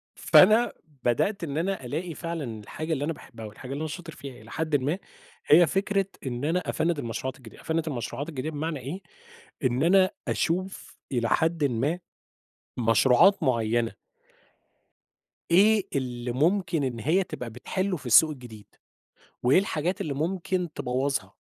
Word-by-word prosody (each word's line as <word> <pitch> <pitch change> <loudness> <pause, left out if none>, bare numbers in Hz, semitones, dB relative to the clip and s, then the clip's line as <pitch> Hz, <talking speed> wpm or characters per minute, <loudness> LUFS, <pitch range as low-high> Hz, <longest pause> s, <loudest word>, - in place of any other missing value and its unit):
فأنا 215 +5 +6 0.3
بدأت 175 - +1
إن 145 -3 -3
أنا 180 -4 -2
ألاقي 160 +7 -3
فعلًا 155 -10 -5
الحاجة 155 +9 -4
اللي 140 -2 -2
أنا 165 - -1
باحبها 115 -6 -11
والحاجة 110 +5 -9
اللي 140 - -4
أنا 160 - -2
شاطر 165 +1 -7
فيها 135 -5 -10
إلى 110 - -14
حدٍ 160 -1 -1
ما، 145 +6 0 0.5
هي 170 +3 +7
فكرة 195 +3 +1 0.2
إن 125 +1 -3
أنا 165 +4 +1
أفنّد 165 -1 0
المشروعات 125 +1 -4
الجديدة، 120 -4 -14
أفنّد 165 0 -1
المشروعات 140 +2 -4
الجديدة 150 -1 -4
بمعنى 155 0 -3
إيه، 145 +10 -6 0.6
إن 125 +1 +1
أنا 185 +3 +5 0.2
أشوف 185 +2 -2
إلى 120 -2 0
حدٍ 160 +4 +1
ما، 140 +6 0 0.8
مشروعات 125 - +5
معيّنة 115 -3 +1 1.6
إيه 205 +3 +5
اللي 125 -3 -2
ممكن 170 +3 +1
إن 120 -3 -3
هي 170 - +2
تبقى 125 -8 -6
بتحلّه 185 - -2
في 140 - -11
السوق 140 +7 +7
الجديد، 120 -7 -10 0.8
وإيه 130 +8 +5
الحاجات 180 -1 -2
اللي 150 - -2
ممكن 175 +2 -2
تبوّظها، 130 +2 -2
150 Hz, 150 wpm, -27 LUFS, 125-175 Hz, 1.6 s, هي